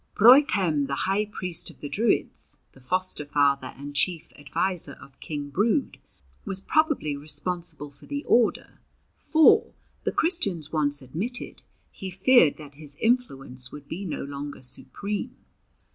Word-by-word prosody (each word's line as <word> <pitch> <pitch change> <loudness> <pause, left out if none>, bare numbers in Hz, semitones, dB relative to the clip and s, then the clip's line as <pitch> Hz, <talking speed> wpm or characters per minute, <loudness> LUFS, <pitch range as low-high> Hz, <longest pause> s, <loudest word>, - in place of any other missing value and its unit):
Broichem, 200 - +5
the 140 - -2
high 195 +3 +1
priest 185 -5 -2
of - - -15
the 145 - -5
Druids, 215 +9 -1
the - - -19
foster 185 +4 -1
father 140 -2 +1
and 145 +1 -8
chief 170 +2 -1
adviser 165 +1 -1
of 135 0 -16
King 145 -2 -5
Brude, 210 - +1 0.4
was 190 - -4
probably 305 - +1
responsible 155 0 -4
for 140 - -16
the 285 0 -4
order, 235 -2 +1 0.4
for, 315 -1 +4 0.3
the - - 0
Christians 200 - 0
once 145 -3 +1
admitted, 195 - -3 0.3
he 190 - -7
feared 190 - +5
that 145 -2 -11
his 145 0 -7
influence 135 - -1
would 145 -1 -10
be 180 +7 -5
no 180 - -4
longer 140 -1 -7
supreme. 205 - -4
165 Hz, 140 wpm, -26 LUFS, 145-210 Hz, 0.4 s, Broichem